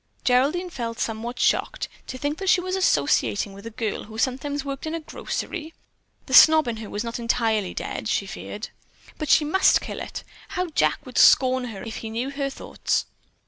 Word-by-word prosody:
Geraldine 290 +9 +2
felt 230 -5 -5
somewhat 230 +2 -3
shocked. - - +1 0.2
To 255 - -6
think 290 +5 -2
that 385 -1 -1
she 360 - +5
was 370 +1 -2
associating 200 - +1
with 200 +3 -10
a - - -4
girl 220 -1 -3
who 220 +1 -10
sometimes 275 +4 -1
worked 275 +2 -5
in 315 - -2
a - - -2
grocery. 320 +1 -5 0.5
The - - -7
snob 315 -3 +8
in 230 -2 -2
her 220 -1 -7
was 210 - -3
not 235 0 -4
entirely 225 -4 0
dead, - - -4
she 205 - 0
feared. 205 +2 -7 0.5
But 305 - -3
she 300 - +5
must 350 +6 +4
kill - - -6
it! - - -6 0.3
How 365 -1 -2
Jack - - +1
would - - -2
scorn 255 -1 +6
her 220 -5 -7
if 225 -1 -6
he 225 - -6
knew 240 +5 -3
her 275 -1 -2
thoughts. 270 - -2
255 Hz, 195 wpm, -24 LUFS, 225-305 Hz, 0.5 s, snob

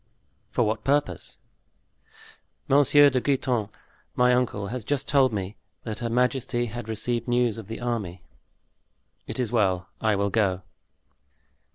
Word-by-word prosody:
"For - - +1
what 110 0 -1
purpose?" 140 - 0 1.3
"Monsieur 145 +1 +6
de 130 -1 +1
Guitant, 125 -6 0 0.5
my 125 0 +4
uncle, 120 -5 0
has 125 0 -4
just 145 +4 -2
told 135 -3 +4
me 100 0 -4 0.3
that 110 -2 -5
her 120 -1 -2
majesty 125 0 0
had 120 0 -7
received 115 +2 -2
news 120 -2 +1
of 110 - -10
the 115 - -6
army." 110 -8 -3 1.0
"It - - -5
is 120 -3 -1
well; 95 -6 +1
I 110 -2 +2
will 100 0 0
go." 95 -4 +1
120 Hz, 140 wpm, -26 LUFS, 105-125 Hz, 1.3 s, Monsieur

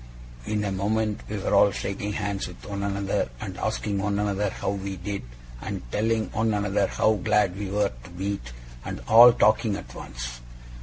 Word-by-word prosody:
In 105 -1 0
a 100 - -1
moment 105 +2 0
we 105 - -3
were 95 - -1
all - - +7
shaking 100 +1 -3
hands 100 -2 -2
with 90 - -12
one 100 -1 -4
another, 100 -6 -1
and - - -6
asking 100 -2 -1
one 100 +1 0
another 105 0 0
how - - -3
we 100 -1 -4
did, 100 +2 -4 0.4
and - - -4
telling 110 +1 0
one 110 -1 +1
another 105 -1 +1
how 110 0 +2
glad 105 -4 +3
we 100 -1 -4
were 105 +1 +1
to - - -11
meet, 95 -7 -4 0.3
and - - -5
all 120 +2 +10
talking 110 -2 +3
at 100 - -8
once. - - -7
100 Hz, 185 wpm, -26 LUFS, 100-105 Hz, 0.4 s, all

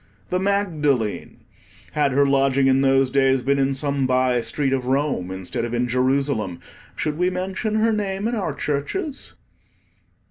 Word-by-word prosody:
The 180 - 0
Magdalene! 155 - -1 0.5
had 145 -2 +1
her 140 +1 +4
lodging 135 -1 +2
in 135 0 +4
those 135 -1 +3
days 135 -1 +2
been 140 +1 +1
in 135 0 +1
some 140 -1 -1
bye 130 -1 +2
street 135 +4 -1
of 130 -2 -2
Rome 135 -9 0
instead 95 +4 -4
of 120 0 -3
in 125 +1 0
Jerusalem, 125 -7 0 0.4
should 150 +1 -2
we 180 0 +3
mention 190 +4 -3
her 220 +1 +2
name 200 0 -2
in 235 - -2
our 215 -5 -2
churches? 270 - -3
140 Hz, 155 wpm, -22 LUFS, 130-180 Hz, 0.5 s, her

